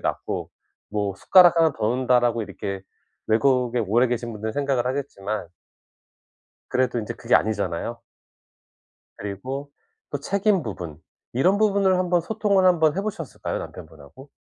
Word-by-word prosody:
낫고. -, -, -3 dB, 0.4 s
뭐 105 Hz, -1 st, -1 dB
숟가락 175 Hz, -, +6 dB
1 160 Hz, -2 st, +4 dB
더 105 Hz, -, -1 dB
놓는다라고 120 Hz, -1 st, +2 dB
이렇게 100 Hz, -1 st, -5 dB, 0.5 s
외국에 125 Hz, +1 st, +2 dB
오래 115 Hz, +5 st, +3 dB
계신 120 Hz, -1 st, -2 dB
분들은 110 Hz, +1 st, -4 dB
생각을 135 Hz, -3 st, 0 dB
하겠지만 110 Hz, -8 st, -3 dB, 1.2 s
그래도 125 Hz, -2 st, 0 dB
인제 110 Hz, +2 st, -5 dB
그게 120 Hz, +2 st, +1 dB
아니잖아요. 110 Hz, +2 st, -1 dB, 1.2 s
그리고 130 Hz, +9 st, -5 dB, 0.4 s
또 -, -, -2 dB
책임 200 Hz, -3 st, +1 dB
부분 85 Hz, -8 st, -6 dB, 0.3 s
이런 180 Hz, +11 st, +3 dB
부분을 195 Hz, -3 st, +3 dB
한번 180 Hz, -1 st, +2 dB
소통을 200 Hz, 0 st, +1 dB
한번 165 Hz, -3 st, +4 dB
해 -, -, +1 dB
보셨을까요? 195 Hz, -8 st, -4 dB
남편분하고? 80 Hz, -, -11 dB
125 Hz, 310 characters per minute, -24 LUFS, 105-165 Hz, 1.2 s, 숟가락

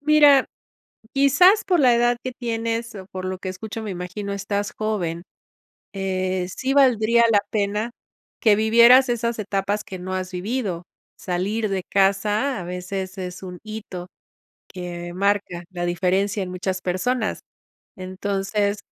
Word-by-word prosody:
mira, 295 Hz, -2 st, +6 dB, 0.7 s
quizás 285 Hz, +10 st, +5 dB
por 360 Hz, -4 st, +2 dB
la 255 Hz, -3 st, +5 dB
edad 240 Hz, 0 st, +3 dB
que 255 Hz, -, -3 dB
tienes 230 Hz, -1 st, -3 dB
o 190 Hz, -2 st, -8 dB
por 185 Hz, 0 st, -5 dB
lo 185 Hz, 0 st, -3 dB
que 190 Hz, 0 st, -5 dB
escucho, 220 Hz, +4 st, -6 dB
me 210 Hz, -, -4 dB
imagino, 185 Hz, +3 st, -5 dB
estás 200 Hz, 0 st, -2 dB
joven. 180 Hz, -6 st, -2 dB, 0.7 s
Eh, 185 Hz, -1 st, -1 dB
sí 265 Hz, +1 st, -1 dB
valdría 235 Hz, -4 st, +4 dB
la 205 Hz, -2 st, +4 dB
pena 210 Hz, +2 st, -1 dB, 0.5 s
que 215 Hz, -3 st, +5 dB
vivieras 235 Hz, +4 st, +6 dB
esas 235 Hz, -1 st, -1 dB
etapas 200 Hz, 0 st, -1 dB
que 190 Hz, -3 st, -8 dB
no 185 Hz, +1 st, -5 dB
has 185 Hz, 0 st, -3 dB
vivido. 190 Hz, -1 st, -3 dB, 0.3 s
Salir 200 Hz, +5 st, -1 dB
de 190 Hz, -2 st, -2 dB
casa 205 Hz, +7 st, +1 dB
a -, -, -5 dB
veces 185 Hz, +2 st, -5 dB
es 180 Hz, 0 st, -6 dB
un 180 Hz, -1 st, -8 dB
hito 215 Hz, -5 st, -7 dB, 0.7 s
que 175 Hz, -1 st, -6 dB
marca 200 Hz, -2 st, 0 dB
la 175 Hz, -2 st, -4 dB
diferencia 190 Hz, +3 st, 0 dB
en 180 Hz, -, -7 dB
muchas 185 Hz, +1 st, -3 dB
personas. 215 Hz, +6 st, -1 dB, 0.6 s
Entonces 195 Hz, +2 st, -2 dB
200 Hz, 145 wpm, -23 LUFS, 185-230 Hz, 0.7 s, mira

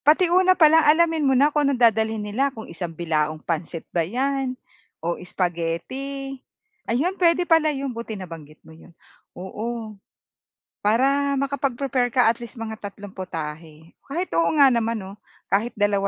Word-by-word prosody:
Pati 315 Hz, +5 st, +6 dB
una 370 Hz, 0 st, +5 dB
pa 320 Hz, -, +7 dB
lang 320 Hz, +1 st, +6 dB
alamin 320 Hz, +1 st, +3 dB
mo 265 Hz, -, +3 dB
na 290 Hz, +3 st, +4 dB
kung 295 Hz, -2 st, +2 dB
anong 275 Hz, -, 0 dB, 0.2 s
dadalhin 220 Hz, 0 st, -2 dB
nila, 250 Hz, +7 st, 0 dB
kung 225 Hz, -5 st, -9 dB
isang 170 Hz, +1 st, -6 dB
bilaong 155 Hz, -2 st, -1 dB
pansit 165 Hz, +1 st, -4 dB
ba 170 Hz, -, +2 dB
yan, 260 Hz, +7 st, -1 dB, 0.4 s
o 170 Hz, +2 st, -2 dB
spaghetti. 185 Hz, +11 st, -3 dB, 0.6 s
Ayun, 285 Hz, +11 st, +1 dB
pwede 350 Hz, 0 st, +4 dB
pala 325 Hz, -2 st, +4 dB
yun 275 Hz, -3 st, -3 dB
buti 230 Hz, -2 st, -6 dB
nabanggit 165 Hz, -5 st, -10 dB
mo 160 Hz, -, -14 dB
yun. 165 Hz, +1 st, -17 dB, 0.4 s
Oo. 220 Hz, +4 st, -5 dB, 0.9 s
Para 275 Hz, +6 st, +2 dB
makapag-prepare 270 Hz, -2 st, 0 dB
ka 245 Hz, -2 st, +4 dB
at 235 Hz, -, -8 dB
least 235 Hz, +1 st, -9 dB
mga 220 Hz, -2 st, -6 dB
tatlong 205 Hz, 0 st, -9 dB
putahe. 160 Hz, -3 st, -7 dB, 0.2 s
Kahit 345 Hz, +7 st, -3 dB
oo 335 Hz, -, +3 dB
nga 280 Hz, -3 st, +6 dB
naman 230 Hz, -1 st, 0 dB
'no, 195 Hz, +2 st, -10 dB, 0.3 s
kahit 215 Hz, +5 st, +1 dB
dalawa 205 Hz, -2 st, +1 dB
230 Hz, 160 wpm, -23 LUFS, 180-275 Hz, 0.9 s, pa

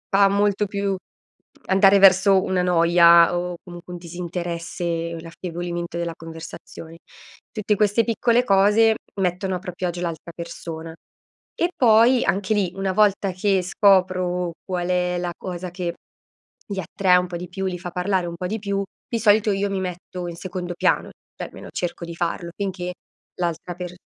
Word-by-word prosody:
fa 200 Hz, 0 st, +6 dB
molto 205 Hz, +1 st, +2 dB
più 200 Hz, 0 st, -1 dB, 0.7 s
andare 195 Hz, +1 st, +5 dB
verso 190 Hz, 0 st, +6 dB
una 185 Hz, -1 st, 0 dB
noia 170 Hz, 0 st, +6 dB
o 175 Hz, 0 st, -3 dB
comunque 175 Hz, 0 st, -10 dB
un 175 Hz, -, -7 dB
disinteresse, 170 Hz, -1 st, -4 dB
l'affievolimento 175 Hz, 0 st, -5 dB
della 170 Hz, -1 st, -2 dB
conversazione; 165 Hz, 0 st, -10 dB, 0.5 s
tutte 210 Hz, -1 st, 0 dB
queste 210 Hz, +2 st, +2 dB
piccole 235 Hz, +1 st, +2 dB
cose, 210 Hz, +2 st, +4 dB, 0.3 s
mettono 185 Hz, +1 st, -1 dB
a -, -, -3 dB
proprio 180 Hz, -1 st, -4 dB
agio 175 Hz, 0 st, -4 dB
l'altra 170 Hz, -1 st, -5 dB
persona. 165 Hz, -1 st, -7 dB, 0.6 s
E 345 Hz, -, +1 dB
poi 235 Hz, +1 st, +5 dB
anche 195 Hz, +3 st, +1 dB
lì, 195 Hz, -4 st, 0 dB
una 195 Hz, 0 st, -1 dB
volta 200 Hz, -1 st, +3 dB
che 195 Hz, 0 st, +1 dB
scopro, 185 Hz, -2 st, +2 dB
qual 180 Hz, -2 st, -2 dB
è 180 Hz, 0 st, +1 dB
la 175 Hz, 0 st, -2 dB
cosa 180 Hz, -1 st, -6 dB
che 175 Hz, -1 st, -3 dB, 0.8 s
li 200 Hz, -1 st, -3 dB
attrae 185 Hz, +1 st, +2 dB
un 180 Hz, 0 st, 0 dB
po' 175 Hz, -, -7 dB
di 180 Hz, 0 st, -8 dB
più, 190 Hz, +2 st, -4 dB
li 185 Hz, -1 st, -2 dB
fa 175 Hz, 0 st, -6 dB
parlare 180 Hz, 0 st, 0 dB
un 170 Hz, -, -5 dB
po' 180 Hz, -, -3 dB
di 215 Hz, +4 st, -2 dB
più, 200 Hz, -1 st, -2 dB, 0.3 s
di 230 Hz, -, -2 dB
solito 210 Hz, -1 st, +4 dB
io 200 Hz, +1 st, 0 dB
mi 195 Hz, -1 st, -2 dB
metto 180 Hz, 0 st, -6 dB
in 170 Hz, -, -6 dB
secondo 180 Hz, -1 st, -5 dB
piano, -, -, +1 dB, 0.3 s
cioè -, -, -5 dB
almeno -, -, -11 dB
cerco 175 Hz, -1 st, -4 dB
di 170 Hz, 0 st, -8 dB
farlo 170 Hz, 0 st, -2 dB
finché 185 Hz, -3 st, -4 dB, 0.4 s
l'altra 175 Hz, 0 st, -3 dB
per 180 Hz, 0 st, -6 dB
180 Hz, 165 wpm, -23 LUFS, 175-195 Hz, 0.8 s, fa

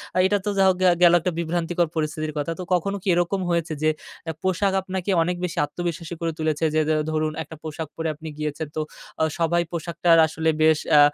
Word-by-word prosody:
আ -, -, 0 dB
এটা 205 Hz, +1 st, +2 dB
তো -, -, +1 dB
যা 195 Hz, -, +5 dB
হোক 185 Hz, -, +2 dB
গে 185 Hz, -, +6 dB, 0.2 s
গেল 175 Hz, -, +7 dB
একটা 180 Hz, -, 0 dB
বিভ্রান্তিকর 170 Hz, 0 st, 0 dB
পরিস্থিতির 155 Hz, 0 st, -2 dB
কথা। 145 Hz, +3 st, -1 dB
তো -, -, -3 dB
কখনো 200 Hz, +3 st, +1 dB
কি -, -, -8 dB
এরকম 175 Hz, +3 st, 0 dB
হয়েছে 170 Hz, -1 st, 0 dB
যে, 155 Hz, -, +4 dB, 0.4 s
অ্যা 160 Hz, -, -3 dB
পোশাক 190 Hz, +1 st, +1 dB
আপনাকে 190 Hz, 0 st, -4 dB
অনেক 180 Hz, +1 st, -1 dB
বেশি 170 Hz, -, -5 dB
আত্মবিশ্বাসী 170 Hz, +1 st, -5 dB
করে 165 Hz, 0 st, 0 dB
তুলেছে 155 Hz, 0 st, 0 dB
যে, 155 Hz, -, +4 dB, 0.3 s
ধরুন, 155 Hz, 0 st, 0 dB
একটা 160 Hz, -, -11 dB
পোশাক 155 Hz, 0 st, -5 dB
পরে 160 Hz, 0 st, -2 dB
আপনি 160 Hz, +1 st, -10 dB
গিয়েছেন 150 Hz, 0 st, -3 dB
তো 155 Hz, -, +1 dB, 0.4 s
অ -, -, +5 dB, 0.2 s
সবাই 170 Hz, +1 st, +2 dB
পোশাকটার 170 Hz, 0 st, +2 dB
আসলে 160 Hz, +1 st, -1 dB
বেশ 155 Hz, -1 st, +5 dB, 0.2 s
আ -, -, +9 dB
165 Hz, 210 wpm, -24 LUFS, 155-175 Hz, 0.4 s, আ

